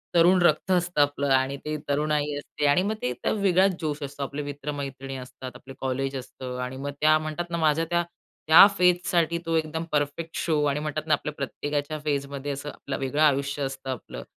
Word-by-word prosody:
तरुण 175 +2 +6
रक्त 175 +2 +3
असतं 175 -3 +2
आपलं 145 0 +1
आणि 130 +1 +2
ते 155 0 -2
तरुणाई 150 0 +1
असते 145 +1 -4
आणि 145 +5 +4
मग 210 +2 -1
ते 125 - -1 0.2
वेगळाच 195 -2 +3
जोश 150 -1 -2
असतो. 140 0 -5
आपले 140 +2 -4
मित्रमैत्रिणी 140 -2 -5
असतात. 130 0 -8
आपलं 135 - -11
कॉलेज 135 +1 -2
असतं. 125 0 -7
आणि 125 +1 -4
मग 140 +1 -4
त्या 155 +1 +6
म्हणतात 155 +2 -4
ना 170 - -2
माझ्या 160 0 +2
त्या, 175 0 +2 0.5
त्या 160 +4 +10
फेजसाठी 175 -2 +2
तो 165 0 0
एकदम 160 +1 -2
परफेक्ट 150 +3 -1
शो 155 -3 +1
आणि 145 0 +1
म्हणतात 155 +1 -4
ना 155 - +3
आपल्या 150 +1 -1
प्रत्येकाच्या 145 +1 -3
फेजमध्ये 140 -1 -2
असं 140 +1 -5
आपलं 140 - -6
वेगळं 135 +3 -1
आयुष्य 140 -1 +2
असतं 135 0 -5
आपलं. 95 - -7
145 Hz, 190 wpm, -26 LUFS, 140-160 Hz, 0.5 s, त्या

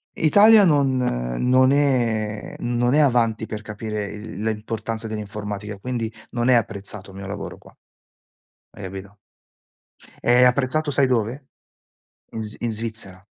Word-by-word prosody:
Italia 205 +6 +6
non 140 -5 +3
non 125 - +2
è 115 -7 0
non 120 +1 0
è 155 - +5
avanti 115 -6 +2
per 110 -1 -6
capire 105 0 -5
il 105 +2 -8
la 110 - 0
importanza 110 +1 -4
dell'informatica, 105 -1 -6
quindi 115 +1 -3 0.2
non 120 +1 0
è - - +6
apprezzato 100 -3 -3
il 95 - -12
mio 100 - -7
lavoro 100 0 -6
qua. - - -19 1.0
Hai 105 - -12
capito? 95 +2 -8 1.1
È 125 +1 +5
apprezzato 135 +4 +2
sai 140 0 +3
dove? 125 +3 -1 0.9
In 110 -1 -5
Svi 105 0 -4
in 115 - 0
Svizzera. 110 -4 -4
110 Hz, 140 wpm, -22 LUFS, 105-125 Hz, 1.1 s, Italia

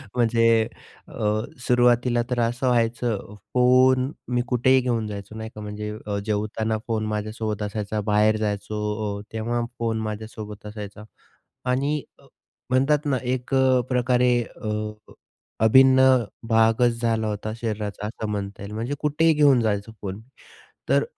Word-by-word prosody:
म्हणजे 115 -1 +3 0.6
अ, - - -14 0.5
सुरुवातीला 120 0 +3
तर 125 -1 -1
असं 120 +3 0
व्हायचं 115 -3 0 0.2
फोन 130 +1 +4 0.2
मी 120 - +3
कुठेही 130 +1 +3
घेऊन 120 -3 -1
जायचो 100 0 -7
नाही 110 0 -6
का. 105 - -7
म्हणजे 105 0 -5 0.3
जेवताना 110 +1 -1
फोन 110 -2 -1
माझ्यासोबत 110 0 -3
असायचा. 105 0 -3
बाहेर 105 +1 +4
जायचो, 105 0 -3 0.4
अ, - - -7
तेव्हा 115 +2 -1 0.2
फोन 115 -1 -1
माझ्यासोबत 110 -1 -6
असायचा. 105 0 -8 0.7
आणि 140 +4 +1 0.7
म्हणतात 135 +4 +2
ना 140 -3 +1
1 125 +1 -3
अ, 130 -1 +4
प्रकारे 125 0 +2
अ, 110 - -8 0.9
अभिन्न 130 +3 +6 0.5
भागचं 115 +2 +4
झाला 115 -2 -1
होता 105 +1 -3
शरीराचा, 105 -2 -3
असं 110 0 -5
म्हणता 100 -1 -4
येईल. 100 - -7
म्हणजे 115 +6 -3
कुठेही 160 +2 +3
घेऊन 145 -5 +5
जायचो 105 0 -1
फोन. 100 +1 -5 0.7
तर - - +3
115 Hz, 130 wpm, -24 LUFS, 105-125 Hz, 0.9 s, अभिन्न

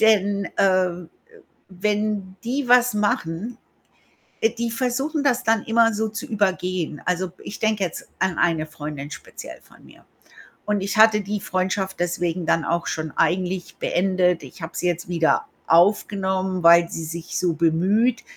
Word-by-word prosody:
Denn, 205 -2 +3
äh 185 -1 +4
äh, 175 -1 -7 0.7
wenn 205 -1 -1
die 255 +2 -2
was 245 0 +5
machen 205 +1 -1 0.8
äh, 225 - +3
die 235 0 -3
versuchen 270 +5 -1
das 255 -3 +2
dann 225 -2 +2
immer 230 0 +3
so 220 +1 -1
zu 225 +6 -6
übergehen. 185 - -1
Also, 180 -1 -1
ich 200 - -8
denke 220 -2 0
jetzt 175 - -6
an 190 -2 0
eine 160 -2 +1
Freundin 150 -2 -7
speziell 170 - -10
von - - -21
mir - - -18 0.6
und 210 -1 0
ich 200 +1 -2
hatte 220 -1 +6
die 205 +1 -3
Freundschaft 190 +1 -2
deswegen 175 0 -1
dann 165 - +2
auch 170 0 -1
schon 155 -1 -3
eigentlich 185 0 0
beendet. 180 -2 +1
Ich - - -12
habe 160 - -7
sie - - -1
jetzt 175 0 -2
wieder 165 -2 +1 0.2
aufgenommen, 190 +1 +2
weil 170 0 +7
sie 165 - -5
sich 165 +1 -5
so 175 -2 +1
bemüht. 190 +10 +2
190 Hz, 155 wpm, -23 LUFS, 175-215 Hz, 0.8 s, weil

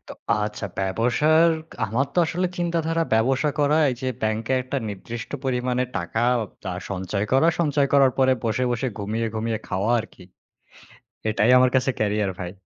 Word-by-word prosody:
তো - - -7 0.3
আচ্ছা, 105 -1 -3
ব্যবসার, 125 - +3 0.4
আমার 120 +7 0
তো - - +1
আসলে 180 +3 -1
চিন্তাধারা, 165 -1 0
ব্যবসা 130 +6 +2
করা 150 +2 +3
এই - - -2
যে, 130 - -2
ব্যাংকে 110 +3 -1
একটা 130 +2 -4
নির্দিষ্ট 115 +4 -7
পরিমাণে 125 -1 0
টাকা, 115 +1 -1 0.4
তা 90 - -3 0.2
সঞ্চয় 100 +2 -2
করা, 145 +6 +5
সঞ্চয় 145 -3 +2
করার 135 -2 +5
পরে 130 0 +4
বসে, 115 +3 0
বসে, 120 +2 -1
ঘুমিয়ে, 110 +3 -2
ঘুমিয়ে, 110 0 -1
খাওয়া 100 +4 -1
আর 110 - -4
কি। 90 - -15 1.1
এটাই 110 +2 +3
আমার 130 0 +5
কাছে 130 +1 +2
ক্যারিয়ার 105 -2 0
ভাই। 90 -1 -4
120 Hz, 160 wpm, -23 LUFS, 105-140 Hz, 1.1 s, করা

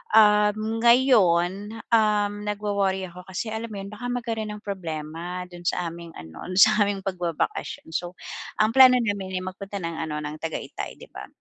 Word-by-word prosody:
um, 215 +1 +4
ngayon, 205 -7 +4 0.2
um, 210 -2 +3
nagwo-worry 200 -2 0
ako 180 +1 -11
kasi 190 +4 -4
alam 220 +1 -4
mo - - -6
'yun 195 +1 -7
baka 220 +4 -6
magkaro'n 230 -3 -3
ng 210 - -12
problema 170 -2 -5
do'n 175 0 -11
sa 175 -1 0
aming 170 0 -10
ano, 80 0 -10
sa 215 +3 +6
aming 200 -1 -2
pagbabakasyon. 175 -3 -3
So, 175 +1 -3 0.4
ang 215 +1 +4
plano 260 -1 +9
namin, 200 -4 -2
eh, - - -7
magpunta 195 +2 -6
ng 165 0 -3
ano 155 -2 -3
ng 150 +1 -5
Tagayatay 160 0 -5
'di - - -13
ba? - - -9
200 Hz, 170 wpm, -25 LUFS, 175-215 Hz, 0.4 s, plano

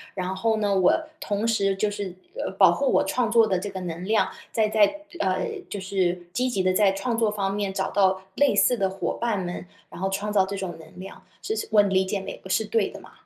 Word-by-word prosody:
然 185 -1 -2
后 220 +3 +1
呢， 205 -2 +1
我 185 -2 +4 0.3
同 205 +1 -2
时 200 -4 +1
就 205 +2 0
是， 200 -3 -5 0.2
呃， - - -3
保 - - +7
护 280 - 0
我 - - +3
创 245 -3 0
作 230 0 +5
的 190 -4 0
这 205 +3 -5
个 190 -1 -6
能 175 0 -5
量， 215 +2 +2 0.2
再 220 -2 +2
在 215 +8 +3 0.2
呃， - - 0 0.2
就 200 - -5
是 180 -2 -1
积 250 +7 0
极 195 -6 -1
地 185 - +3
在 195 0 +4
创 225 +4 -2
作 225 -2 +2
方 200 -2 -2
面 200 -1 -2
找 190 -1 -2
到 190 -1 +2
类 285 -1 +3
似 245 - +4
的 195 -3 +1
伙 190 - -3
伴 225 -5 0
们， 175 0 -5 0.2
然 - - -11
后 190 - 0
创 200 +2 -2
造 195 -2 +3
这 200 +1 -5
种 185 -4 -5
能 160 - -14
量， 195 - -10 0.2
是 435 - -3
是 - - -3
我 215 -1 +7
理 190 -2 +2
解 195 +1 -2
没？ 195 - -7
我 - - -8
是 205 - +2
对 215 0 +1
的 - - -10
嘛？ - - -15
200 Hz, 265 characters per minute, -25 LUFS, 190-215 Hz, 0.3 s, 保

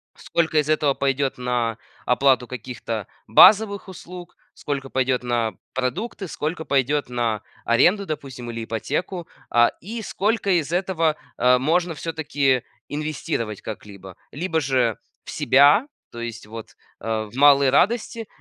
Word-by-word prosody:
сколько 160 -2 -1
из 150 +1 -1
этого 150 -2 +2
пойдет 135 -1 -1
на 120 -2 -1 0.3
оплату 125 -1 +3
каких-то 115 -4 -5 0.2
базовых 200 - +6
услуг, 180 -1 -10 0.2
сколько 140 -2 -4
пойдет 130 -1 0
на 120 -2 0 0.2
продукты, 185 - -3
сколько 160 0 -4
пойдет 140 0 +1
на 115 -3 -1 0.2
аренду, 180 - +3
допустим, 130 -6 -6
или 115 -1 -5
ипотеку, 165 - -3 0.2
а, 120 0 +4
и 225 +5 -6
сколько 210 0 -1
из 155 +2 -5
этого, 175 -4 +1 0.2
э, 125 0 +5
можно 165 +5 +1
всё-таки 145 -5 0 0.3
инвестировать 150 - -3
как-либо. 100 -3 -9
Либо 160 +2 -1
же 130 -5 +1 0.3
в - - -9
себя, 145 - +5 0.2
то 120 - -9
есть 115 -2 -6
вот, 115 0 -10 0.2
э, 110 -1 -3
в - - -14
малые 140 -1 +6
радости, 225 - +1
140 Hz, 135 wpm, -23 LUFS, 120-165 Hz, 0.3 s, базовых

